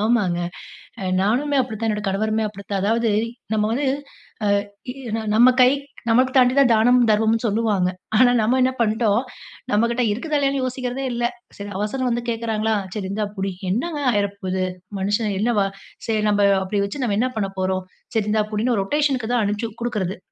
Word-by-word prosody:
ஆமாங்க. 210 -6 +2 0.6
அ - - -5 0.2
நானுமே 275 +8 +1
அப்படி 230 -3 -6
தான். 225 - -1
என்னோட 210 -1 -1
கணவருமே 215 +3 0
அப்படித்தான். 200 -1 -5
அதாவது 225 +2 +2 0.4
நம்ம 215 -1 +2
வந்து 280 +5 0 0.8
அ - - -19 0.2
இ - - -8 0.2
ந - - -1
நம்ம 240 +4 +7
கை, 250 - +8 0.4
நமக்கு 255 +3 +4
தாண்டி 250 0 +5
தான் 260 -3 +5
தானமும், 245 +3 +4
தர்மமும்ன்னு 220 +2 +2
சொல்லுவாங்க. 210 -4 +1 0.3
ஆனா, 245 0 +6
நம்ம 235 +4 +2
என்ன 255 +1 +3
பண்ட்டோம். 220 0 +2 0.5
நம்மகிட்ட 235 +4 +2
இருக்குதா 295 +8 -1
இல்லையான்னு 275 -1 +1
யோசிக்கிறதே 255 +1 -3
இல்ல. 240 0 -2 0.3
சரி 200 0 -6
அவசரம் 250 +5 -1
வந்து 240 0 -1
கேக்கிறாங்ர்களா? 225 -1 0 0.2
'சரி 200 -3 -3
இந்தா 210 +1 -1
புடி." 195 0 -1 0.2
என்னாங்க 295 - -1
ஆயிர 200 -1 +1 0.2
போது? 185 0 -1 0.4
மனுஷன் 205 +1 0
என்ன 235 +3 +1
வா 195 - +3 0.4
சரி 220 -2 +1
நம்ப 205 -1 +2 0.2
அப்டி 200 +2 -1
வச்சு 255 +7 -4
நம்ம 205 -5 0
என்னா 255 +2 +1
பண்ணப்போறோம்? 190 -2 -1 0.3
சரி 220 -2 +2
இந்தா 215 0 +2
புடின்னு 225 +1 +1
ரொட்டேஷன்க்கு 260 0 0
தான் 240 -3 +2
அனுப்ச்சு 210 +3 -2
குடுக்கிறது. 210 -6 -2
220 Hz, 170 wpm, -22 LUFS, 205-245 Hz, 0.8 s, கை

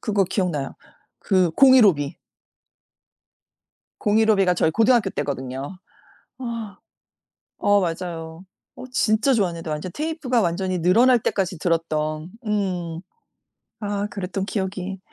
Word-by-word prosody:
그거 205 -3 +1
기억나요 170 -8 -2 0.4
그 185 -3 +2
공일오비. 200 - +5 1.8
공일오비가 210 -3 +3
저희 160 -2 +2
고등학교 225 0 +3
때거든요. 135 +4 -4 0.6
아. 230 -5 -6 0.8
어 205 0 +3
맞아요. 165 -1 -5 0.3
어 - - -9
진짜 230 +2 +2
좋았는데 170 -7 -1
완전 155 +4 -4
테이프가 305 -6 -1
완전히 185 0 -1
늘어날 235 +9 +5
때까지 190 -5 -1
들었던 155 -1 -1 0.2
음 180 -6 -2 0.9
아 205 0 -2
그랬던 190 -1 -4
기억이. 190 -2 -4
190 Hz, 255 characters per minute, -23 LUFS, 165-215 Hz, 1.8 s, 공일오비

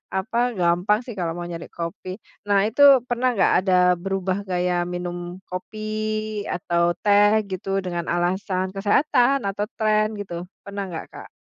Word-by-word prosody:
apa, 215 +5 -2 0.2
gampang 180 +5 +2
sih 250 - -7
kalau 165 -2 -1
mau 175 - -5
nyari 170 -1 -6
kopi. 170 +2 -6 0.4
Nah 200 -1 +4
itu 255 +6 -1 0.3
pernah 245 +1 +1
gak, 195 - +3
ada 185 0 0 0.3
berubah 195 -1 -1
gaya 180 0 0 0.2
minum 175 0 -4 0.3
kopi 185 +4 -6 0.7
atau 170 -1 0 0.2
teh 205 0 +5 0.2
gitu 190 +1 -5 0.2
dengan 175 -2 -3
alasan 185 +2 0
kesehatan 250 +5 +2
atau 205 +1 -2
tren 215 -1 +2
gitu, 190 -4 -6 0.3
pernah 200 0 -5
gak 160 - -5
Kak? - - -10
195 Hz, 145 wpm, -23 LUFS, 175-210 Hz, 0.7 s, teh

